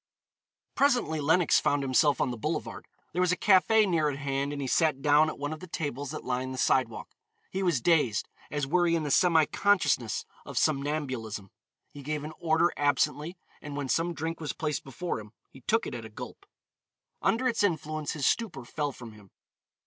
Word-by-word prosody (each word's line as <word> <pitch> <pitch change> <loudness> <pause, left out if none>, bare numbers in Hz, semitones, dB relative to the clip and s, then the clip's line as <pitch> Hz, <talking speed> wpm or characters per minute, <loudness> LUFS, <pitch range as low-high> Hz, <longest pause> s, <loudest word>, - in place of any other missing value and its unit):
Presently 245 - +2
Lenox 160 +3 +4
found 145 -1 +1
himself 140 +2 +3
on 125 - +1
the 120 - -5
boulevard. 110 - -4 0.3
There 180 - 0
was 180 -1 +3
a 180 - +1
café 210 +2 +5
near 160 -5 +2
at 140 - -4
hand, 140 0 -2
and 145 - -4
he 135 - -3
sat 150 -1 +2
down 150 +1 +5
at - - -6
one 145 +2 -3
of 155 - -8
the 185 - -10
tables 145 -4 -4
that - - -6
lined 130 +1 -2
the - - -8
sidewalk. 125 -2 0 0.4
He 190 - -2
was 175 -9 +1
dazed 150 -10 +2 0.2
as 145 -2 -2
were 175 +5 +2
he 170 - +3
in 165 - -1
the 145 - -2
semi 165 -2 +5
consciousness 180 - +1 0.2
of - - -8
somnambulism. 135 -9 -1 0.4
He 145 -1 -10
gave 150 +1 -3
an 155 +1 -6
order 165 +1 +2
absently, 145 +3 0 0.2
and 145 -1 -7
when 140 -2 -3
some 170 +3 0
drink 160 +1 -4
was 155 -2 -3
placed 150 -3 -2
before 135 +2 -4
him, 105 0 -12 0.2
he 135 - -15
took 225 - +1
it - - -5
at 120 -2 -6
a 110 - -9
gulp. 105 - -10 0.7
Under 255 +3 +2
its 235 - 0
influence 155 -5 -1
his 145 -4 -2
stupor 165 - 0
fell 145 +3 -2
from 120 -3 -10
him. 105 -2 -16
150 Hz, 200 wpm, -28 LUFS, 135-170 Hz, 0.7 s, café